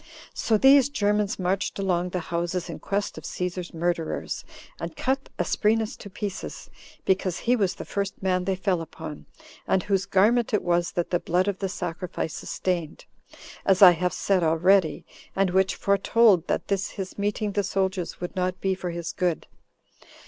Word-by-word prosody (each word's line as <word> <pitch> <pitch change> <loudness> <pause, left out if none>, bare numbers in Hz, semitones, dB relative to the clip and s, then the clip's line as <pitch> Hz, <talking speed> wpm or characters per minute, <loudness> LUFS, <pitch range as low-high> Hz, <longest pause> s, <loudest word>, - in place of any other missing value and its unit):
So 220 - +1
these 270 +3 +6
Germans 210 -4 +1
marched 190 +2 -1
along 180 -2 0
the 180 0 -2
houses 170 +1 -2
in 160 - -7
quest 200 +1 -2
of - - -15
Cæsar's 180 -1 -4
murderers, 170 -1 -2 0.4
and - - -5
cut 270 +1 -1
Asprenas 220 0 +1
to 200 - -10
pieces, 200 0 -6 0.3
because 185 -2 +1
he 245 +1 +3
was 200 -6 0
the - - -7
first 200 -1 -3
man 185 -1 +1
they 190 0 +1
fell 185 -2 0
upon, 155 -2 -8 0.4
and 190 - +2
whose 195 -1 0
garment 215 +4 +3
it 210 - 0
was 175 0 +1
that 175 - -2
the 175 - +2
blood 180 +3 +1
of 200 -2 -1
the 195 - -2
sacrifices 175 -3 -4
stained, 175 -4 -2 0.6
as 195 0 +4
I 180 - +11
have 180 +1 0
said 195 -2 +1
already, 165 +2 +3 0.3
and 195 -1 +2
which 190 +1 +2
foretold 200 -2 +3
that - - -1
this 195 -2 0
his 190 0 -7
meeting 205 +1 -1
the 205 - +1
soldiers 190 -2 -2
would 175 +2 -5
not 185 0 -1
be 190 -1 +1
for 185 -1 -4
his 170 -1 -4
good. 175 -3 -1
190 Hz, 170 wpm, -25 LUFS, 175-200 Hz, 0.6 s, I